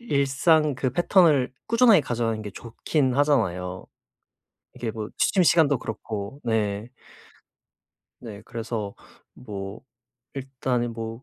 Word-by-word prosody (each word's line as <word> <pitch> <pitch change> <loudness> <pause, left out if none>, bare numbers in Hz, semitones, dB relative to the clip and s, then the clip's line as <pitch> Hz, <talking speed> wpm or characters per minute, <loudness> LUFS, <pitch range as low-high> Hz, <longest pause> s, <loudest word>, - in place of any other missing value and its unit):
일상 150 - +2
그 130 0 -1
패턴을 165 -6 +3 0.2
꾸준하게 230 -5 +6
가져가는 115 -3 -2
게 105 - -6
좋긴 125 +5 -1
하잖아요. 95 -11 0 0.9
이게 120 -3 -4
뭐 110 -1 -5
취침 185 - +3
시간도 155 -6 +4
그렇고. 110 +4 -6
네. 110 -1 -1 1.3
네. 105 -4 -9
그래서 110 -3 -5 0.4
뭐 100 -3 -7 0.5
일단은 130 -3 -2
뭐 115 +2 -6
120 Hz, 225 characters per minute, -25 LUFS, 110-145 Hz, 1.3 s, 꾸준하게